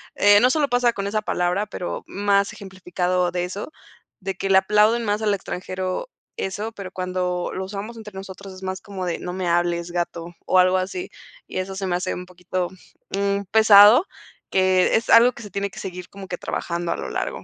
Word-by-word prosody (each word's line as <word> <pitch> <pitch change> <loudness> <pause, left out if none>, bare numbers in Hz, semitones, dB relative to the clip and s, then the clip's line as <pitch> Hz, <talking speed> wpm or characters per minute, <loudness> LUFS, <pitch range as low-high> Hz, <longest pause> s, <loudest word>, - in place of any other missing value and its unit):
eh, 205 0 +6
no 250 - +5
solo 290 0 +1
pasa 245 -1 +3
con 195 - -4
esa 215 +1 -1
palabra, 180 +1 0
pero 180 -3 -5
más 200 0 +1
ejemplificado 180 -2 -2
de 175 0 -1
eso, 195 +11 -5 0.5
de 195 +1 -3
que 195 - -3
le 190 - +6
aplauden 210 +4 +3
más 210 +1 0
al 210 -1 +2
extranjero 185 - -4 0.3
eso, 205 +4 -3
pero 195 -4 -8
cuando 180 -1 -2
lo 190 0 -4
usamos 210 +4 -6
entre 215 -2 -10
nosotros 190 0 -9
es 185 - -12
más 190 0 -3
como 195 -3 -6
de: 170 - -1
"No 180 - -5
me 185 -1 -3
hables, 170 0 +1
gato", 175 0 -4
o 185 - +4
algo 185 +1 +4
así. 195 - -3 0.4
Y - - -6
eso 190 +1 -3
se 195 -1 -3
me 175 - 0
hace 180 +1 -2
un 180 - -6
poquito, 180 0 -3 0.5
mm, 200 0 0
pesado, 220 - +8 0.5
que 185 -1 +3
es 225 - 0
algo 235 +2 +7
que - - -11
se 210 - -9
tiene 200 0 -2
que - - -10
seguir 180 -1 -7
como 195 -1 -10
que 180 - -4
trabajando 170 0 -3
a - - 0
lo - - -5
largo. - - -3
190 Hz, 205 wpm, -23 LUFS, 180-205 Hz, 0.5 s, pesado